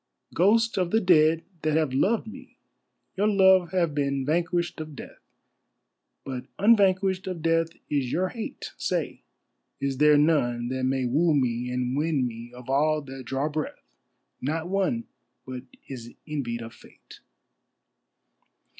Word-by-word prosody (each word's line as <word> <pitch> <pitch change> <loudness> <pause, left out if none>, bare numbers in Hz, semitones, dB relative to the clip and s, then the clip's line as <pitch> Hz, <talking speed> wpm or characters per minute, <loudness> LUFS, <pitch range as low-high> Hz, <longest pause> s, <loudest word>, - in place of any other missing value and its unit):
Ghosts 225 +5 +3
of 180 -2 +1
the 220 - +3
dead 165 -4 +4 0.2
that 155 0 +1
have 155 -5 0
loved 205 - +2
me, 260 +4 -12 0.6
your 205 +2 +2
love 190 -4 +5
has 170 -3 +1
been 140 -2 -1
vanquished 170 +3 0
of 155 -2 -8
death, - - -10 1.1
But 130 -2 -5
unvanquished 195 -3 +3
of 175 -4 -5
death 165 0 +2 0.2
is 135 -4 -1
your 185 +2 0
hate; 225 +1 -7
Say, - - -2 0.6
is 140 -1 -2
there 150 0 +6
none 120 -6 +2
that 130 0 -1
may 130 0 0
woo 155 +6 +2
me 125 -2 0
and 125 0 -1
win 150 -3 +1
me 120 0 -7
of 125 0 -12
all 150 +3 +2
that 135 -1 -9
draw 135 +4 -1
breath, 155 0 -5 0.5
Not 160 +5 -2
one 200 +5 0 0.4
but 130 0 -7 0.2
is 120 -3 -9
envied 120 -6 -3
of 115 +1 -9
Fate? - - -17
155 Hz, 145 wpm, -26 LUFS, 130-180 Hz, 1.1 s, there